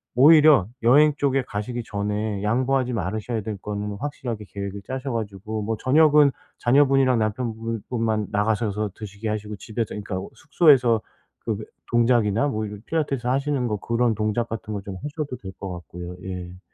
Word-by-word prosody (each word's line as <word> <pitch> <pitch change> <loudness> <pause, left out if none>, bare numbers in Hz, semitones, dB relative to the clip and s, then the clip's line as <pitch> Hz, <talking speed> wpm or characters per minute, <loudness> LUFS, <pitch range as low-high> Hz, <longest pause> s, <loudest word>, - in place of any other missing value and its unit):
오히려 150 - +7 0.2
여행 145 +5 +6
쪽에 135 -2 +1
가시기 120 +1 -4
전에 105 0 -2
양보하지 130 +3 +1
말으셔야 110 +3 -2
될 105 -1 -5
거는 105 0 -4
확실하게 120 -7 -4
계획을 100 0 -5
짜셔 130 0 -4
가지고 110 0 -4
뭐 110 +1 -2
저녁은 150 +3 +5 0.3
자녀분이랑 135 -1 +4
남편 110 +2 -1
분 115 0 -4
분만 110 -4 0
나가셔서 105 0 0
드시게 105 +1 -6
하시고 105 0 -3
집에서 110 0 -4
이 105 - -4
그러니까 95 -2 -4
숙소에서 135 -7 +4 0.4
그 110 - 0
왜 110 - -7 0.3
동작이나 120 +1 +3
뭐 110 -5 -2
이런 105 -1 -8
필라테스 145 -6 -1
하시는 135 0 0
거 105 -2 -1
그런 115 +3 +1
동작 110 +2 0
같은 110 -1 -5
거 100 - -3
좀 95 -1 -7
하셔도 145 -2 -4
될 95 -5 -8
것 95 -2 -5
같고요. 90 0 -8
예. 90 -1 -6
110 Hz, 375 characters per minute, -24 LUFS, 105-130 Hz, 0.4 s, 오히려